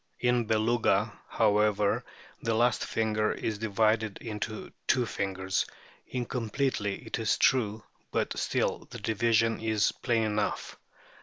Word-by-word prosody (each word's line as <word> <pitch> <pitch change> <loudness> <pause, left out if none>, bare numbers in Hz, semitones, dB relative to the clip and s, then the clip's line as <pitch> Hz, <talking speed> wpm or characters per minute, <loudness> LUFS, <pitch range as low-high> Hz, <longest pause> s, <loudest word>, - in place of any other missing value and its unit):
In 125 -1 +2
Beluga, 110 -1 +2 0.2
however, 105 -1 +2 0.4
the 115 -1 0
last 120 +1 +3
finger 110 -1 0
is 110 -2 -3
divided 110 0 +1
into 110 -1 -5 0.2
two 125 -2 +3
fingers, 95 -3 -1 0.4
incompletely 120 -3 -2
it - - -3
is 110 - +2
true, 110 -4 +2 0.3
but - - 0
still - - -1
the - - -7
division 115 +1 +2
is 110 -2 +2
plain 115 -2 0
enough. 105 -1 -1
110 Hz, 120 wpm, -29 LUFS, 105-115 Hz, 0.4 s, last